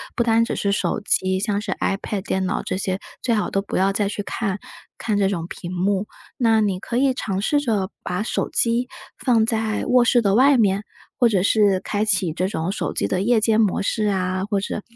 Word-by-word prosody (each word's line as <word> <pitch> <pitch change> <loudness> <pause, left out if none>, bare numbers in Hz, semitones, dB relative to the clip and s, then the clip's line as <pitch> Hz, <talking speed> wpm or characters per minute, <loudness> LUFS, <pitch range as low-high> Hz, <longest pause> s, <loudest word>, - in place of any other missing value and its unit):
不 235 - +2
单 230 0 +3
只 - - -3
是 200 - 0
手 200 - -1
机， 190 -2 +1
像 205 -1 0
是 205 -2 -3
ipad、 195 0 -2
电 190 0 -1
脑 - - -2
这 - - -3
些， 190 0 -1 0.2
最 235 -3 +1
好 210 - 0
都 195 - 0
不 200 - -6
要 195 +1 +3
再 200 0 0
去 205 0 -4
看， 200 -3 -2 0.4
看 215 -2 -1
这 200 -1 +3
种 175 -4 -2
屏 175 0 -7
幕。 195 +3 0 0.3
那 225 -3 +3
你 195 -3 0
可 235 - -5
以 265 +1 +3
尝 195 -6 -3
试 290 +7 +2
着 215 -8 -1
把 180 +4 -2
手 - - -2
机， 235 +2 +1 0.3
放 230 -4 +2
在 220 -2 -1
卧 250 -1 +4
室 240 0 +4
的 200 -2 +2
外 265 +3 +5
面， 200 -2 +2 0.4
或 240 - +5
者 190 -4 +1
是 205 -3 +3
开 205 0 -1
启 185 -6 +1
这 185 +3 -1
种 175 -1 -2
手 - - -3
机 - - 0
的 185 - -1
夜 230 +2 +3
间 220 0 +3
模 205 -4 +1
式 215 0 0
啊， 185 -1 -1
或 200 -2 +1
者， 210 +1 -4
205 Hz, 255 characters per minute, -22 LUFS, 190-225 Hz, 0.4 s, 外